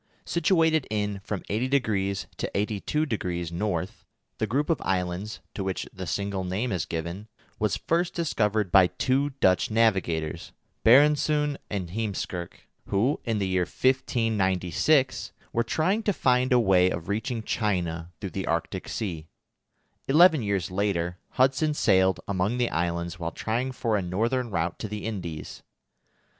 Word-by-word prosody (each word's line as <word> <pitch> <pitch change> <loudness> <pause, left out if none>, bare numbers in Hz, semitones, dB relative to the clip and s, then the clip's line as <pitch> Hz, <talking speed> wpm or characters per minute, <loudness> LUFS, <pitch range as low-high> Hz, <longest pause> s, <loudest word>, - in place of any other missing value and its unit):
Situated 160 -4 +2
in 105 -2 -2
from 100 -3 -4
80° 105 -5 0
to - - -3
82° 100 - -1 0.3
N., - - -7 0.5
the 110 - 0
group 145 - 0
of 165 - 0
islands, 90 +2 -2
to 100 - -4
which 95 -1 -2
the 95 -1 -6
single 100 +3 -2
name 100 +7 -2
is 90 -5 -2
given, 85 +5 -4 0.3
was 105 -1 +1
first 170 +1 0
discovered 105 - 0
by 95 -2 +7
two 135 +8 0
Dutch 90 0 +3
navigators, 90 -7 0 0.3
Barendszoon 150 +3 +4
and 95 -5 -3
Heemskirk, 95 -4 -4 0.2
who, 115 +9 +1
in 115 -3 0
the 100 -2 0
year 95 -1 +1
1596, 115 - +1 0.2
were 115 - +2
trying 160 - +1
to 210 -2 +1
find 125 -3 +2
a 125 - +6
way 95 -5 +4
of 85 -2 -4
reaching 110 +3 -2
China 90 -7 -1
through 95 -3 -5
the 95 - -4
Arctic 85 0 -2
Sea. 85 -8 -4 0.8
Eleven 160 +1 +6
years 100 -4 -1
later, 90 -3 -1
Hudson 135 +4 +2
sailed 95 -7 +3
among 100 +4 0
the 125 -1 +1
islands 85 +1 -2
while 85 -1 -3
trying 120 +8 -2
for 115 -4 -1
a 100 - +1
northern 115 +8 -1
route 85 -3 -2
to - - -4
the 105 0 -5
Indies. 90 -8 -5
105 Hz, 145 wpm, -26 LUFS, 90-125 Hz, 0.8 s, by